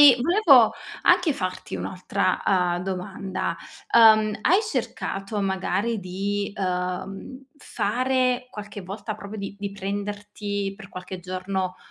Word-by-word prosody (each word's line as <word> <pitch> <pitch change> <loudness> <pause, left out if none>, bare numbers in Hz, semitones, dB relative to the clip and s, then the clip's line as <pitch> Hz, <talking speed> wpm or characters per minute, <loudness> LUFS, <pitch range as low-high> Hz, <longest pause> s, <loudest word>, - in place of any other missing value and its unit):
E 290 -3 +10
volevo 275 - +6 0.3
anche 355 -3 +4
farti 185 -7 -4
un'altra, 190 +2 -1
uhm, 180 -2 +2
domanda: 190 +1 -3 0.4
ehm, 215 -2 +7
hai 365 +5 +5
cercato 210 - -3
magari 195 +3 0
di, 200 +2 -2
ehm, 190 +6 -3
fare 255 +1 0
qualche 210 -1 -8
volta 205 +4 -5
proprio 210 0 -8
di 200 0 -6
di 200 -1 -4
prenderti 205 0 -4
per 200 -1 -12
qualche 185 0 -7
giorno, 185 0 -3
200 Hz, 115 wpm, -25 LUFS, 190-225 Hz, 0.4 s, E